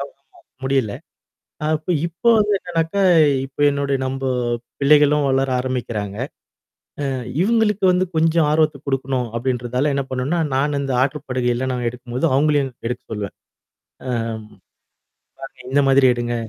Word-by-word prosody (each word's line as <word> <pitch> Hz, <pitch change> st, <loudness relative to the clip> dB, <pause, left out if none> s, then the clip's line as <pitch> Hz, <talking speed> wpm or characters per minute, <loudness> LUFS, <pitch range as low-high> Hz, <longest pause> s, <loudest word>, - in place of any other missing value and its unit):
கவனமா 140 Hz, 0 st, -10 dB, 0.4 s
முடியல. 130 Hz, -6 st, +1 dB, 0.8 s
அப்ப 155 Hz, +3 st, 0 dB
இப்போ 170 Hz, +8 st, 0 dB
வந்து 210 Hz, -1 st, +2 dB
என்னனாக்கா 170 Hz, +2 st, -1 dB, 0.4 s
இப்ப 135 Hz, +2 st, -17 dB
என்னுடைய 140 Hz, -1 st, -1 dB
நம்ப 135 Hz, +1 st, -3 dB, 0.6 s
பிள்ளைகளும் 150 Hz, 0 st, +5 dB
வளர 135 Hz, 0 st, +1 dB
ஆரம்பிக்கிறாங்க. 115 Hz, -6 st, -3 dB, 0.9 s
ஆ -, -, -2 dB, 0.3 s
இவங்களுக்கு 210 Hz, -1 st, +2 dB
வந்து 180 Hz, +1 st, +2 dB
கொஞ்சம் 160 Hz, 0 st, +3 dB
ஆர்வத்த 155 Hz, -1 st, +2 dB
குடுக்கணும் 130 Hz, -2 st, -1 dB
அப்டின்றதால 125 Hz, +3 st, -1 dB
என்ன 140 Hz, -, -1 dB
பண்ணுனா, 130 Hz, +7 st, -1 dB, 0.2 s
நானு 140 Hz, +1 st, +1 dB
இந்த 135 Hz, -1 st, -2 dB
ஆற்று 145 Hz, +2 st, -2 dB
படுகையல்ல 125 Hz, 0 st, -1 dB
நான் 125 Hz, -1 st, -2 dB
எடுக்கும்போது 125 Hz, +1 st, -3 dB
அவங்களையும் 140 Hz, -2 st, +2 dB
எடுக்க 125 Hz, +1 st, -4 dB
சொல்வேன். 105 Hz, -2 st, -5 dB, 0.7 s
ஆ. -, -, -1 dB, 1.3 s
பாருங்க 135 Hz, -1 st, -10 dB
இந்த 140 Hz, +1 st, +3 dB
மாதிரி 135 Hz, -1 st, +5 dB
எடுங்க! 120 Hz, 0 st, -2 dB
135 Hz, 125 wpm, -20 LUFS, 125-150 Hz, 1.3 s, பிள்ளைகளும்